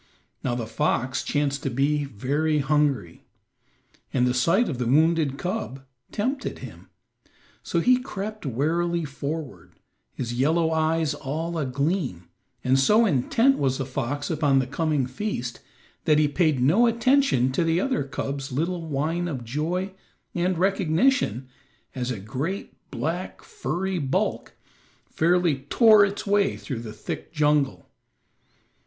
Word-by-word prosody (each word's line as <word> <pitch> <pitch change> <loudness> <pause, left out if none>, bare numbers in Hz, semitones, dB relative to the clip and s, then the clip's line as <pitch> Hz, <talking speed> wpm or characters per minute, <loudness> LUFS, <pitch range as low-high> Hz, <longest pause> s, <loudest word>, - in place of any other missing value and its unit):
Now 120 -2 0
the 120 -2 -3
fox 130 +1 -1
chanced 145 -1 -1
to - - -2
be 145 +3 +1
very 140 +6 0
hungry, 140 - 0 0.9
and 125 -1 +2
the 125 - +2
sight 165 - +3
of 130 -6 -3
the 125 - -1
wounded 155 0 +3
cub 175 - -4 0.3
tempted 265 +6 -2
him. - - -11 0.7
So 170 - -1
he 250 +7 +5
crept 215 -3 -6
warily 165 +6 0
forward, 145 +1 -6 0.4
his 120 -2 -4
yellow 160 +6 +2
eyes 160 -1 +1
all 160 +5 -4
agleam, 140 - -1 0.4
and 130 +1 +3
so 210 +12 +5
intent 225 - +2
was 135 -2 +1
the 135 - -2
fox 140 +3 -3
upon 145 -3 +2
the 130 - +2
coming 150 0 0
feast 125 - -4 0.5
that 150 - +4
he 150 -1 +4
paid 155 -2 +1
no 195 - +5
attention 235 - +3
to 170 - +1
the 165 +1 +2
other 255 - 0
cub's 135 +1 -4
little 170 +6 -1
whine 160 +4 -1
of 135 -7 -4
joy 170 - -2 0.4
and 180 0 0
recognition 180 - +1 0.5
as 125 -1 -3
a 120 -5 -3
great, 135 - -5
black, - - -4
furry 190 - -3
bulk 135 -3 -1 0.5
fairly 170 -3 +2
tore 220 -3 +7
its 200 0 -1
way 200 0 +2
through 130 -6 -5
the 115 -2 -7
thick - - -6
jungle. 150 -3 +1
150 Hz, 135 wpm, -25 LUFS, 135-175 Hz, 0.9 s, tore